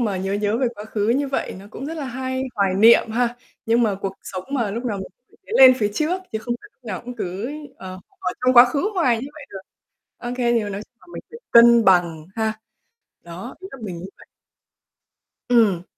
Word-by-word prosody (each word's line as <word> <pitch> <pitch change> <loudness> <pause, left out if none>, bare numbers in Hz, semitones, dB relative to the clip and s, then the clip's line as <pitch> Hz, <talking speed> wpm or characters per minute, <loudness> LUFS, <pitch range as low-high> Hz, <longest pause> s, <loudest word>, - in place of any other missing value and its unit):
mà 210 -5 0
nhớ 190 +1 -3
nhớ 205 +2 0
về 260 - +1
quá 210 -1 -9
khứ 215 -1 -2
như 275 +4 +1
vậy 270 - -2
nó 195 - -12
cũng 270 - -7
rất 320 - -5
là 300 - -4
hay, 260 0 -3
hoài 195 -2 +1
niệm 225 +3 +6
ha. 240 +1 0 0.3
Nhưng 230 +2 +3
mà 215 -3 +1
cuộc 195 0 -5
sống 185 -1 -6
mà, 235 -7 -1
lúc 235 +4 -5
nào 220 -4 -2
mình 190 - -6 0.2
cũng - - -25
phải - - -10
lên 260 -1 +9
phía 210 -2 0
trước 345 - -1
chứ 220 - -1
không 240 +2 -3
phải 420 - -15
lúc 255 - -45
nào 200 -5 -5
cũng 245 0 -8
cứ, 200 +4 -4 0.3
ờ, 185 0 -9 0.2
ở - - -2
trong 255 0 +3
quá 240 0 +10
khứ 280 - -1
hoài 260 -11 +2
như 270 - -6
vậy 300 - -10
được. 195 - -8 0.6
OK, 245 0 -5
thì 240 -2 +2
mà - - -4
nói 200 0 -5
chung 230 - -20
là - - -21
mình - - -7
phải 465 - -10
cân 235 -1 +7
bằng, 170 -4 +3
ha. 220 -1 0 0.7
Đó, 175 +8 -9
ý 380 - -9
là 270 - -10
mình 185 -5 -5
muốn 180 +3 -8
vậy. - - -17 1.2
Ừm. 215 -8 +4
230 Hz, 235 wpm, -22 LUFS, 200-255 Hz, 1.2 s, quá